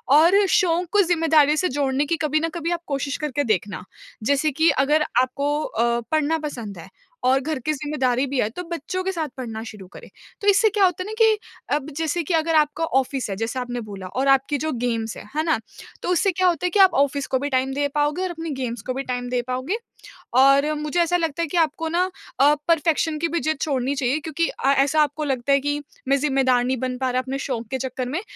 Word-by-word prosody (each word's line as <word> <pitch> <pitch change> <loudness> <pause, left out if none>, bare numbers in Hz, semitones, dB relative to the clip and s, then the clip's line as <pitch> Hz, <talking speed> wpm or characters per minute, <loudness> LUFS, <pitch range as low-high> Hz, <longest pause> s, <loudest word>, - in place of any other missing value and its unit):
और 355 +7 +6
शौक 360 -3 +2
को 415 - +5
ज़िम्मेदारियों 320 -4 +3
से 365 - +2
जोड़ने 275 +1 0
की 335 - 0
कभी 305 0 +1
न 330 +1 -1
कभी 335 0 -2
आप 345 -1 -1
कोशिश 280 0 -2
करके 290 -2 -2
देखना। 205 -5 -1 0.4
जैसे 285 +5 +2
कि 320 +4 +3
अगर 300 +3 +2 0.2
आपको 285 +3 -1
अ, 235 -1 0
पढ़ना 310 +1 +2
पसंद 240 - -6
है 170 +3 -11 0.3
और 260 +2 +4
घर 300 +1 -3
की 310 - +1
ज़िम्मेदारी 270 -3 0
भी 270 0 -2
है 210 - +1
तो 315 +11 -7
बच्चों 340 +3 -3
के 380 - -1
साथ 325 -5 -3
पढ़ना 225 -4 -5
शुरू 210 -4 -10
करें। - - -12 0.3
तो 405 - -3
इससे 410 +2 +5
क्या 405 -1 +3
होता 365 0 0
है - - -9
ना 430 - -5
कि 440 -1 +5 0.4
अब 295 0 -3
जैसे 325 +1 -1
कि 330 - -2
अगर 325 0 +2
आपका 305 +1 +2
ऑफ़िस 265 -4 -1
है, 195 - -2
जैसे 225 +5 -3
आपने 245 -1 -4
बोला 200 -4 -8
और 260 +9 -2
आपकी 270 +1 +3
जो 315 +3 -2
गेम्स 230 -3 -2
हैं, - - -11
है 310 - +1
ना? 320 -6 +1 0.4
तो - - -2
उससे 360 +2 +2
क्या 370 +1 +1
होता 345 -1 +1
है - - +2
कि 410 - +1
आप 380 -3 +7
ऑफ़िस 280 0 -2
को 260 - 0
भी 285 +2 -2
टाइम 260 0 0
दे 285 +1 0
पाओगे 295 +4 +1
और 370 - -1
अपनी 330 -1 -6
गेम्स 240 -1 -3
को 255 - -1
भी 270 +2 -3
टाइम 245 -1 -4
दे 250 0 0
पाओगे। 255 - -2 0.6
और 275 +3 +5
मुझे 300 +3 -2
ऐसा 345 +1 +2
लगता 330 -1 -1
है - - -1
कि 325 - -3
आपको 325 0 +1
ना 340 +2 +1 0.4
अ, 285 +2 +6
परफ़ेक्शन 320 -1 +2
की 335 - +1
भी 335 +1 -1
ज़िद 310 +2 -1
छोड़नी 270 -2 0
चाहिए 270 +2 0
क्योंकि 325 +2 -1
अ, 270 - 0
ऐसा 285 +3 +3
आपको 300 +1 0
लगता 270 -2 -1
है 275 - +4
कि 290 +1 -2 0.3
मैं 275 +1 +3
ज़िम्मेदार 265 -3 +2
नहीं 260 +1 0
बन 255 +1 -3
पा 260 0 -1
रहा 255 +1 +1
अपने 260 +1 -4
शौक 235 -5 -4
के 265 - 0
चक्कर 255 -1 -4
में। 315 +8 -2
290 Hz, 240 wpm, -23 LUFS, 255-325 Hz, 0.6 s, आप